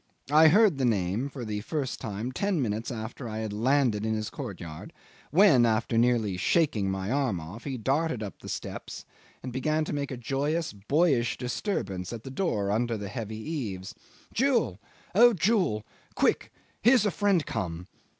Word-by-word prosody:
I 155 +2 +8
heard 190 -3 +5
the - - +1
name 110 +2 +1
for 130 -4 -7
the 105 -1 -3
first 140 +2 -3
time 110 +4 -4
ten 195 +5 0
minutes 110 -3 -1
after 115 +1 -6
I 110 - -5
had 110 -2 -3
landed 120 -1 +2
in 110 0 0
his 110 -1 -3
courtyard, 80 -3 -7 0.4
when, 165 -7 +6
after 115 0 +1
nearly 115 -5 +2
shaking 110 - +2
my 95 +2 -2
arm 130 -9 +1
off, 90 +9 -9
he 135 -3 -3
darted 135 0 0
up 100 - -7
the - - -9
steps - - -6 0.4
and 125 -1 -5
began 155 +4 0
to - - -4
make 145 -1 -2
a 130 - -5
joyous, 145 +6 -1
boyish 120 - +1
disturbance 120 - -3
at 115 -2 -7
the 135 - -7
door 110 - 0
under 115 +2 0
the 100 -1 -6
heavy 110 -1 -5
eaves. 110 - -5 0.4
"Jewel! 235 - +1 0.3
O 240 +5 +7
Jewel! 180 - +1 0.3
Quick! - - +1 0.3
Here's 245 -1 +5
a 205 - +2
friend 195 -5 +2
come 90 -5 -4
120 Hz, 170 wpm, -28 LUFS, 105-155 Hz, 0.4 s, I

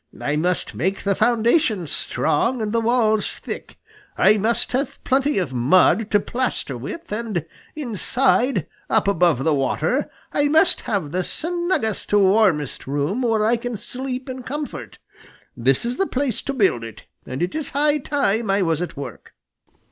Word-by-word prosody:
I 145 - -1
must 175 +3 0
make 190 +4 -2
the 200 - +2
foundations 225 - +2
strong 235 - 0
and 215 -2 -2
the 230 - +2
walls 225 -2 +2
thick. - - -8 0.4
I 215 - +5
must 225 +3 0
have 270 +2 -1
plenty 270 +1 +1
of 175 -9 -1
mud 180 - +4
to 205 - +4
plaster 240 - -2
with, 235 - -7
and 210 -7 -2 0.3
inside, 255 0 +1 0.2
up - - +2
above 170 -8 +3
the 160 - +2
water, 135 -2 0 0.2
I 290 0 +2
must 320 +5 +3
have 190 -9 -1
the 185 +2 0
snuggest, 345 - -2
warmest 190 - +3
room 145 - -1
where 225 -3 +2
I 235 +2 +3
can 240 -1 -4
sleep 255 +4 -5
in 260 0 -6
comfort. 290 +4 -6 0.6
This 130 - +1
is 245 +1 -2
the 390 - +1
place 265 -4 -1
to 275 - -3
build 195 - +2
it, 115 -2 -9 0.2
and 130 +6 -3
it 180 - -2
is 310 -2 -3
high 295 +1 +2
time 235 -6 0
I 195 0 +3
was 165 -2 0
at 175 - -5
work." 135 -5 -8
220 Hz, 165 wpm, -22 LUFS, 175-260 Hz, 0.6 s, I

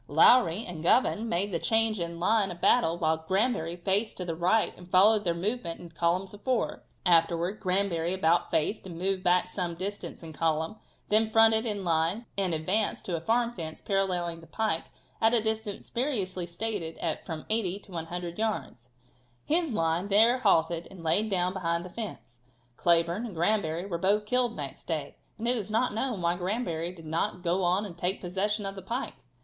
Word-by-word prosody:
Lowrey 185 - +5
and 170 -3 -6
Govan 225 +4 +2
made 195 +3 0
the 170 - -1
change 225 -2 +1
in 170 0 -4
line 205 +2 +3
of 175 -1 -8
battle 175 -8 +3
while 160 -1 +1
Granbury 180 0 0
faced 195 +5 -1
to 180 - -4
the 170 - -2
right 185 +7 +2
and 180 0 -14
followed 205 +4 +5
their 170 -3 0
movement 185 -1 -3
in 170 -1 -11
column 170 +3 +1
of 205 - -12
fours. 255 -3 -1 0.3
Afterwards 170 +3 +2
Granbury 180 -3 +2
about 175 -2 +2
faced, 190 +6 0
and 170 -3 -8
moving 190 +1 0
back 180 0 +3
some 180 -2 -3
distance 195 +1 -5
in 160 -1 -8
column, 160 +5 -1 0.3
then 215 +1 +3
fronted 225 +1 +5
into 205 -3 -2
line 170 +6 +1
and 195 -3 0
advanced 185 +7 0
to 180 - -2
a 165 - -4
farm 235 +5 +1
fence 160 -8 -7
paralleling 180 -4 -1
the 165 - -15
pike 215 -7 -1 0.4
at 225 +1 +4
a - - +5
distance 220 -1 -3
variously 200 -9 -1
stated 170 -2 -3
at 165 -2 -3
from 160 -2 -6
80 200 -4 +1
to 195 - -16
100 175 +1 -5
yards. 210 - -3 0.6
His 330 +1 +2
line 165 -1 0
there 225 +5 +5
halted 170 -6 +2
and 185 -3 -12
laid 205 +7 +2
down 180 -2 +1
behind 170 -2 -1
the 180 - -9
fence. 150 - -7 0.3
Cleburne 170 - +2
and 205 - -9
Granbury 175 -1 0
were 170 -4 -4
both 205 +3 +2
killed 245 +1 +1
next 140 -3 -6
day, 155 -4 -4 0.2
and 230 +1 -3
it 245 - +3
is 215 -4 -4
not 225 +2 +1
known 225 -4 -2
why 170 +1 +2
Granbury 175 -3 -2
did 165 -3 -13
not 165 +3 -2
go 175 +2 +1
on 180 +4 +2
and 185 -4 -8
take 180 +2 -1
possession 200 +3 -1
of 195 - -3
the 195 - -8
pike. 240 +8 -5
185 Hz, 190 wpm, -28 LUFS, 170-215 Hz, 0.6 s, Lowrey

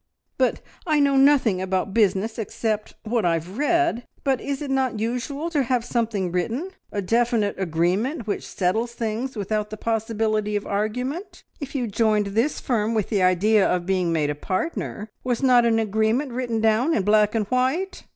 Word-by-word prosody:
"But - - +1 0.3
I 305 -2 +3
know 280 -1 +3
nothing 270 -8 +4
about 190 +1 -1
business 215 +1 +1
except 215 0 -3
what 225 0 0
I 170 - +3
have 175 - -6
read 335 -5 +2 0.2
but 270 -3 +1
is 280 -1 -3
it 285 -2 -4
not 260 -5 0
usual 255 +8 -3
to 295 -4 +2
have 250 -2 0
something 220 -7 -1
written 230 - -2 0.2
a 200 - -2
definite 230 0 +1
agreement 190 - 0
which 210 - -3
settles 220 +6 -1
things 235 +3 -3
without 210 0 -2
the 215 - -7
possibility 220 -1 -1
of 205 - -2
argument? 250 - -3 0.2
If 285 -2 -7
you 255 -3 0
joined 215 -1 +1
this 235 +8 +1
firm 230 -2 0
with 215 -3 0
the 205 -4 +1
idea 195 +4 +4
of 180 -2 +1
being 185 -2 +1
made 150 -3 +1
a - - -1
partner, 205 - -3 0.2
was 250 +1 -1
not 245 -2 +5
an 225 -1 +3
agreement 220 +5 +1
written 240 -2 -2
down 225 +8 +3
in 200 - +1
black 210 +1 +3
and 215 -2 +1
white?" 265 +10 0
225 Hz, 180 wpm, -23 LUFS, 205-255 Hz, 0.3 s, not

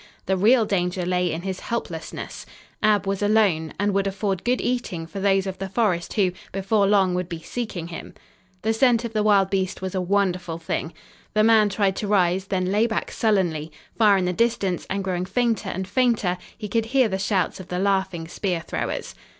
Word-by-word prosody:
The 190 - +1
real 220 +5 +4
danger 180 -2 -1
lay 180 -1 +1
in 160 +2 -4
his 190 -1 -3
helplessness. 170 -8 -5 0.3
Ab 210 -2 +3
was 195 0 -2
alone, 205 -7 +2
and 205 0 +1
would 195 0 +1
afford 195 -1 -2
good 245 +1 +1
eating 240 -10 -2
for 195 +4 -7
those 195 -1 +2
of 190 -1 -5
the 195 0 -4
forest 195 -5 0
who, 195 -4 +2 0.2
before 195 +1 +1
long, 195 -3 +3
would 180 -1 -2
be 170 - -5
seeking 175 -2 -5
him. 165 - -8 0.5
The 220 +1 +2
scent 235 0 +3
of 230 - -5
the 215 - +1
wild 200 -2 +3
beast 190 -1 -1
was 190 - -3
a 185 - 0
wonderful 180 -3 0
thing. 160 0 -3 0.4
The 215 - +4
man 220 -2 +5
tried 195 -1 +1
to 210 - -2
rise, 190 -2 +2
then 185 -1 -1
lay 215 +3 +3
back 220 - -2
sullenly. 175 -8 0 0.2
Far 210 -3 +5
in 185 - 0
the 180 - 0
distance, 195 -3 0
and 195 0 -1
growing 180 -1 -2
fainter 230 +3 0
and 190 +1 -4
fainter, 215 -6 +1 0.2
he 215 - -5
could 225 +1 0
hear 255 +1 +3
the 190 -2 -2
shouts 195 -3 0
of 185 - -9
the 180 - -3
laughing 190 -3 0
spear 180 -1 -2
throwers. - - -4
195 Hz, 200 wpm, -24 LUFS, 180-215 Hz, 0.5 s, man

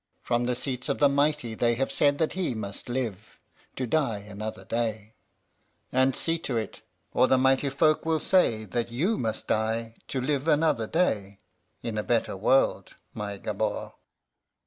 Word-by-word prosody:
"From 120 0 +1
the 125 - +1
seats 125 +1 -4
of 140 - +1
the 145 - +5
mighty 140 -4 +1
they 120 +1 +2
have 135 +3 -1
said 145 +1 +3
that 160 0 0
he 180 -9 -1
must 100 +1 -6
live 115 -5 -4 0.4
to 130 - -2
die 125 -4 +1
another 105 +1 -7
day; 110 -2 -2 0.8
and 130 +1 +3
see 165 0 0
to 135 -7 -2
it, 110 -3 -4 0.3
or 130 - +4
the 130 - +4
mighty 135 +2 +3
folk 155 +3 +3
will 160 -1 +1
say 115 - +2
that 120 +3 -2
you 175 - 0
must 110 -2 -2
die 110 +1 0
to 135 - -2
live 140 +3 -1
another 150 -7 +3
day 105 - 0 0.5
in 110 -2 -2
a - - -2
better 115 -3 0
world, 120 +7 +2 0.2
my 100 -1 -4
Gabord." - - -2
120 Hz, 170 wpm, -27 LUFS, 110-140 Hz, 0.8 s, the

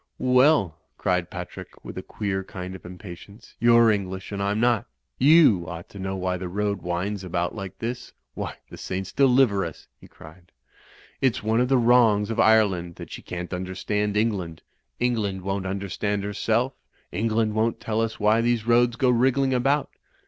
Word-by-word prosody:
"Well," 125 - +3 0.2
cried 90 -1 0
Patrick, 90 -1 -9
with - - -8
a - - -4
queer 95 -2 -3
kind 95 0 -7
of 95 -1 -10
im 90 0 -10
patience, 100 +4 -12
"you're 115 -1 +6
English 95 -2 -3
and 100 -1 -3
I'm 100 +2 0
not. 120 -3 +2 0.3
You 140 - +5
ought 85 0 -8
to 100 - -11
know 95 0 -3
why 90 -1 -2
the 90 0 -5
road 100 0 -2
winds 90 +4 -3
about 85 -1 -2
like 95 -4 -7
this. 120 +2 -5 0.2
Why, - - -5 0.2
the - - -10
Saints 95 0 -4
deliver 125 -7 +3
us!" 80 -3 -7
he - - -15
cried, 85 +3 -16 0.7
"it's 130 -3 +1
one 110 +2 +2
of 125 - +1
the 135 - +4
wrongs 115 -3 +4
of 115 - -3
Ireland 95 -6 +3
that - - -10
she - - -7
can't 90 +1 -6
understand 100 +3 -2
England. 100 -7 -1 0.4
Eng 125 0 +2
land 100 -3 -3
won't 95 0 -2
tmderstand 100 +1 -2
herself, 115 +5 0 0.4
England 110 +2 0
won't 110 +1 0
tcU 110 0 -1
us 115 -1 -4
why 110 +2 +3
these 120 -1 0
roads 120 0 +3
go 125 +1 +2
wriggling 130 +2 +2
about. 135 +3 +1
105 Hz, 180 wpm, -25 LUFS, 95-115 Hz, 0.7 s, you're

